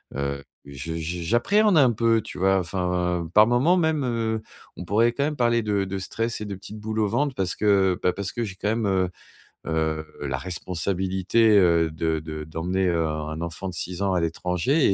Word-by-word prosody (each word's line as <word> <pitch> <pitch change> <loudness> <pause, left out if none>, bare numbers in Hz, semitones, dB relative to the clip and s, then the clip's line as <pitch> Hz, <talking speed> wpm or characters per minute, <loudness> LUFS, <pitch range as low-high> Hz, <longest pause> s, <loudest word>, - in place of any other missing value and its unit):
heu, 70 0 -2 0.2
je 70 +4 -6
je 85 +2 -4
j'appréhende 185 - +3
un 130 -5 +6
peu, 115 0 +2
tu - - -9
vois? 95 +1 +3
Enfin 90 -1 -1
par 105 +1 +7
moments 125 +9 +3
même, 160 -4 +1
heu, 115 -2 -1 0.4
on 90 - -6
pourrait 110 +6 +3
quand 140 - -1
même 150 0 -2
parler 120 -2 +2
de 105 -2 0
de 95 +1 -4
stress 115 +4 -3
et - - -3
de 100 -1 -5
petite 100 +3 -10
boule 110 +1 -3
au 105 - +2
ventre 135 +5 0
parce 95 -2 -1
que 95 -3 +3
bah, 90 - +3
parce 100 -1 -4
que 120 - -2
j'ai 95 -3 -7
quand 105 - -2
même, 110 0 0
heu 95 -2 +1 0.6
heu 80 -1 -1 0.2
la 70 -2 -2
responsabilité, 95 - 0
heu, 85 -4 +4
de 80 0 -1
de 75 0 -6
d'emmener, 90 +5 -1
heu, 85 -1 +1
un 75 -1 -3
un 80 +1 -5
enfant 85 +3 -5
de 90 - -6
6 90 +1 -4
ans 100 -1 +1
à 90 - +1
l'étranger 90 - +1
95 Hz, 210 wpm, -24 LUFS, 85-115 Hz, 0.6 s, par